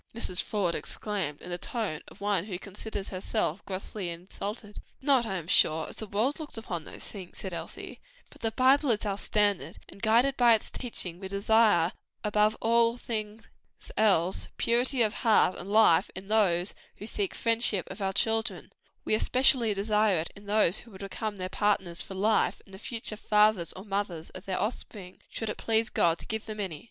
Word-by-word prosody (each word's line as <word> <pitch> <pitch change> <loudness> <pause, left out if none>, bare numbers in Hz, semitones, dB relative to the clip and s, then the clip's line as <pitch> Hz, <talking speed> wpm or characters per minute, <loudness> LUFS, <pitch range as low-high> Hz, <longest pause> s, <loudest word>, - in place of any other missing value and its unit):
Mrs. 185 -6 -2
Faude 195 -5 -1
exclaimed, 190 -10 -3
in 180 - -8
the 175 - -3
tone 210 -10 -3
of - - -14
one 200 -3 +1
who 190 -4 -4
considers 200 +1 -6
herself 190 -1 -2
grossly 190 0 -4
insulted. 200 +5 -7 0.2
"Not, 265 -4 +3
I 195 - -2
am 175 -4 -4
sure, 160 -2 +3
as - - -8
the 220 - -6
world 225 +10 0
looks 305 -6 -7
upon 175 -8 -4
these - - -9
things," 190 -4 -9
said 190 -2 -5
Elsie, - - -7 0.3
"but - - -17
the 225 - +1
Bible 265 +4 +4
is 215 -2 +1
our 200 -2 0
standard; 200 -8 +1
and 200 - -14
guided 235 +5 +4
by 240 -2 +7
its 215 - -5
teachings 185 -8 -4
we 190 - -4
desire 200 -3 +3 0.3
above 210 0 +2
all 230 +1 +3
things 220 -2 -4 0.5
else, 190 -4 +2
purity 245 +2 +2
of 215 -1 +1
heart 220 -5 +3
and 190 - -7
life 205 -4 +5
in 190 +2 -8
those 190 -4 +2 0.2
who 205 - -9
seek 205 -3 -2
the - - -10
friendship 230 -5 +1
of - - -8
our 190 -1 +1
children; 225 +3 0
and - - -20 0.3
very - - 0
especially 250 -1 +3
in 205 - -1 0.7
those 205 -3 +3
who 230 -4 -13
are - - -8
to 195 +1 -7
become 215 0 -4
their 185 -1 -3
partners 190 -3 0
for 190 - -8
life, 210 +3 +2
and 195 - -18
the 190 - -9
future 225 -1 -4
fathers 210 -4 +3
or 190 - -10
mothers 195 -5 -3
of 185 +1 -10
their 190 -1 -2
offspring, 205 -4 -5
should 225 - -5
it 210 - -3
please 225 0 +1
God 170 -1 +3
to - - -12
give 220 +1 -4
them 215 -1 -6
any." 180 -7 -3
210 Hz, 195 wpm, -29 LUFS, 185-225 Hz, 0.7 s, by